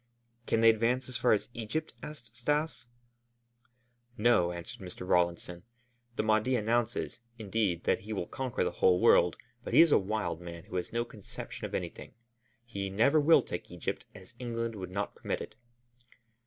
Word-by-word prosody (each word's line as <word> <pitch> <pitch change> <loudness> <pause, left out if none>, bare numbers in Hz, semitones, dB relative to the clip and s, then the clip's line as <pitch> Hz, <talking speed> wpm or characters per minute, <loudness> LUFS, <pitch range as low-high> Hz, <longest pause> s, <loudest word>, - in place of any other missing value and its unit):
"Can 115 - +2
they 115 0 +8
advance 115 +4 0
as 125 - -3
far 125 - +3
as 105 - +2
Egypt?" 120 +8 -3
asked 120 -7 -9
Stas. 145 +1 -1 1.3
"No," 105 -6 +4
answered 90 +7 -8
Mr. 90 0 -8
Rawlinson. 85 -1 +1 0.5
"The - - 0
Mahdi 110 +4 +2
announces, 120 +1 0 0.2
indeed, 100 -5 -1
that - - +2
he 105 +3 -9
will 100 -5 -2
conquer 130 +2 -2
the 90 - 0
whole 90 +1 +3
world, 90 -1 +5 0.3
but - - -3
he - - +10
is 165 -2 +6
a - - +6
wild 105 -3 -2
man 85 -1 -8
who 90 - -5
has 90 - -3
no 120 0 0
conception 105 -4 -8
of - - -5
anything. - - -6 0.5
He 100 -4 -4
never 115 +10 +4
will 155 +3 +6
take 85 - -6
Egypt, 85 -1 -4
as - - -13
England 115 -2 -3
would 95 -4 -6
not 100 +2 -3
permit - - -3
it." - - -8
110 Hz, 170 wpm, -31 LUFS, 90-120 Hz, 1.3 s, he